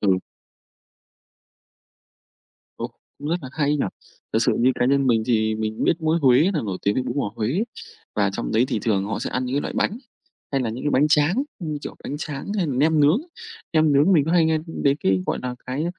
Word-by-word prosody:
Ừ. 95 -3 +3 2.6
Ồ, - - -5 0.3
cũng 145 +1 -5
rất 170 - +1
là 130 - -6
hay 150 -2 0
nhỉ. 145 - 0 0.5
Thật - - +3
sự - - +2
như 125 +2 +4
cá - - 0
nhân 140 +1 +3
mình 115 -3 +3
thì 110 -3 +2
mình 110 0 -2
biết 170 - +2
mỗi 160 +1 +2
Huế 135 +7 +5
là 155 - +1
nổi 95 -3 -3
tiếng 100 - +1
với 130 - 0
bún 125 +1 -4
bò 105 -8 -1
Huế. 130 - 0 0.5
Và - - +2
trong - - -3
đấy 115 - +4
thì - - 0
thường 100 -2 0
họ 105 - -3
sẽ - - -4
ăn 130 - -1
những 125 +1 -3
cái 145 - +2
loại - - -4
bánh 215 - 0 0.5
hay 135 - +1
là 115 - -1
những 120 +4 -6
cái 145 - +1
bánh 145 +4 +3
tráng, 160 - +3 0.2
như 155 -5 -4
kiểu - - -6
bánh 145 - -4
tráng 150 +5 -5
hay 185 -4 +1
nem 150 +3 +2
nướng. 150 - +4 0.5
Nem 155 -2 +4
nướng 145 +7 +4
mình 155 -6 +4
có 160 - -1
hay 175 -2 +5
nghe, 160 0 +2
ừm, 165 - -6
đến 140 0 +3
cái, 95 -1 +2
gọi - - -1
là, 125 -1 -3
cái 130 +5 -2
140 Hz, 235 wpm, -23 LUFS, 120-155 Hz, 2.6 s, Huế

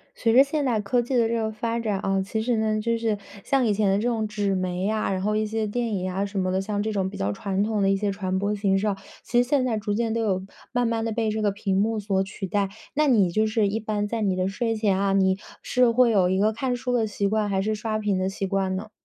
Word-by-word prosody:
随 225 -1 +1
着 265 +3 +8
现 285 +1 -2
代 235 -5 +1
科 240 +5 +1
技 250 +2 -3
的 235 -2 +4
这 235 - 0
个 220 -1 -1
发 230 +2 -2
展 210 -4 -1
啊， 195 0 0
其 210 +3 -2
实 235 0 0
呢， 215 0 +1
就 230 +1 0
是 225 -2 0 0.3
像 270 -3 +2
以 210 - +2
前 205 -1 +2
的 195 - +3
这 210 - -1
种 220 -2 -1
纸 205 -2 -1
媒 185 -1 -2
呀， 215 0 0
然 190 -1 -1
后 210 +2 0
一 215 0 +1
些 220 0 -2
电 230 +1 -2
影 185 -1 -2
啊 195 +2 -1
什 200 0 -6
么 185 0 0
的， 190 +1 0
像 205 +1 -2
这 220 - -1
种 195 -3 -1
比 - - -9
较 100 +1 -1
传 195 - -1
统 215 -1 0
的 195 - +3
一 195 - +3
些 200 +1 -1
传 190 -2 -2
播 200 +2 0
形 200 -2 +1
式 205 +2 0
啊。 200 -2 0 0.3
其 240 0 +2
实 245 - -2
现 275 0 +2
在 230 -3 0
逐 210 -1 -2
渐 225 +1 0
都 230 - 0
有 190 -4 0 0.3
慢 245 -1 +2
慢 230 -1 -1
地 225 - -1
被 220 0 0
这 215 0 -2
个 205 -1 +2
屏 195 -1 -1
幕 220 +2 +1
所 195 -2 0
取 195 0 -6
代。 200 +1 0 0.2
那 300 +1 +2
你 205 -9 +4
就 215 +5 +2
是 215 -1 +1
一 210 +3 -1
般 210 -1 -2
在 225 +1 -3
你 195 -3 +1
的 185 0 0
睡 225 +3 -1
前 205 -3 +1
啊， 195 0 +1
你 190 -1 +3 0.2
是 250 -1 +3
会 235 0 +4
有 190 -4 +3
一 190 - +1
个 210 +3 +3
看 250 +3 -2
书 250 0 -3
的 230 -3 +2
习 200 -1 -1
惯， 215 0 0
还 190 -1 +1
是 215 +2 0
刷 215 0 -2
屏 210 -3 0
的 185 - 0
习 195 0 -3
惯 190 -1 0
呢？ 200 +3 -6
210 Hz, 320 characters per minute, -25 LUFS, 195-225 Hz, 0.3 s, 着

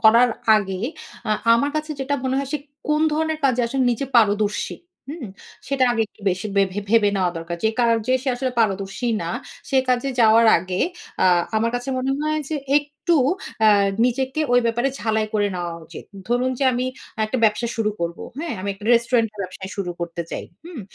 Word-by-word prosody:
করার 235 +2 +6 0.3
আগে 195 -3 -2 0.5
আ - - +1 0.2
আমার 285 +5 +1
কাছে 305 0 -3
যেটা 270 +2 -1
মনে 260 0 0
হয় 275 -1 -2
সে 300 - 0 0.3
কোন 300 0 +2
ধরনের 315 0 0
কাজে 255 -2 +3
আসলে 265 +3 0
নিজে 240 +4 -2
পারদর্শী, 210 -2 +2 0.3
হুম? 295 -3 -6 0.4
সেটা 270 -1 +2
আগে 230 -2 +1
একটু 215 - -27
বেশি 185 +4 -3
ভে 200 - +6 0.3
ভেবে 225 -2 +5
নেওয়া 185 -2 +1
দরকার। 165 +1 -4
যে - - +5
কাজে 230 0 +2
সে 270 - -2
আসলে 260 +1 -1
পারদর্শী 195 +2 -1
না, - - -3 0.4
সে 270 - +2
কাজে 250 +2 +1
যাওয়ার 225 0 +6
আগে 185 +1 -4 0.4
আ - - +5 0.3
আমার 230 +2 +1
কাছে 245 +2 -3
মনে 260 +1 -1
হয় 305 0 0
যে 315 - -2 0.2
একটু 295 +4 -2 0.5
অ্যা 220 - +6 0.4
নিজেকে 260 +4 0
ওই 245 - +6
ব্যাপারে 240 +3 +1
ঝালাই 220 -1 0
করে 205 -1 +2
নেওয়া 175 -1 -3
উচিত। - - -10 0.2
ধরুন 245 +2 +1
যে 275 - +1
আমি 250 +1 -1 0.4
একটা 215 +4 -2
ব্যবসা 220 +2 +2
শুরু 220 -2 +1
করবো। 170 0 -3 0.2
হ্যাঁ? 325 +1 -3
আমি 195 - -4
একটা 200 +1 -13
রেস্টুরেন্ট 235 -1 +2
এর - - -17
ব্যবসা 185 +1 -7
শুরু 195 -3 -2
করতে 170 0 -3
চাই, - - -4 0.2
হুম? 340 -6 -8
235 Hz, 190 wpm, -22 LUFS, 205-265 Hz, 0.5 s, করার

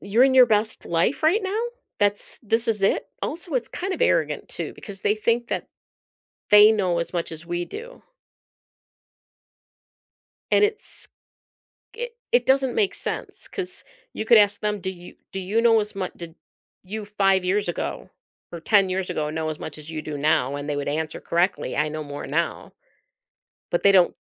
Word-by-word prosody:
you're 215 +5 +2
in 265 -1 +3
your 255 -1 +8
best 215 0 0
life 170 +11 0
right 345 +8 +3
now? 395 +3 -1 0.4
That's 205 0 +2
this 225 +1 +1
is 215 -2 +1
it?” 195 - +1
Also, 335 -1 -3
it's 245 -2 0
kind 380 +2 -4
of - - -5
arrogant, 485 - +1
too, - - -5
because 200 -3 -9
they 210 - +2
think 235 +2 0
that - - -3 0.8
they 210 +1 +9
know 185 -6 +1
as 170 - -3
much 170 -1 -3
as 160 0 -8
we 175 0 -3
do 480 - -10 2.5
And - - +5
it's 425 +1 +2 0.9
i 485 +1 -3 0.2
it 245 0 +3
doesn't 265 -1 +3
make 415 -3 +1
sense, - - -3
'cause 365 -2 -4 0.3
you - - -4
could 230 0 +7
ask 205 -1 +4
them, 210 -1 -1
"Do 190 - -3
you 175 -1 -13 0.2
do 195 - -4
you 200 +5 0
know 230 -1 +5
as 210 0 -3 0.2
did 170 -1 -9 0.5
you 210 +3 -6
5 195 -2 +2
years 200 +2 +1
ago, 175 - -4 0.4
or 170 - -6
10 195 +2 +3
years 185 0 -2
ago, 155 -4 -2
know 160 0 -2
as 155 - -5
much 155 - -6
as 155 +1 -7
you 155 -1 -4
do 150 -1 -5
now?" 140 -2 +1
and 145 +1 -5
they 145 - -1
would 145 0 -3
answer 155 +1 -2
correctly, 175 +3 0
"I 150 0 +1
know 155 0 -5
more 145 0 -7
now." - - -2 1.0
But 175 - 0
they 200 - +6
don't 185 -2 +5
200 Hz, 185 wpm, -24 LUFS, 170-235 Hz, 2.5 s, they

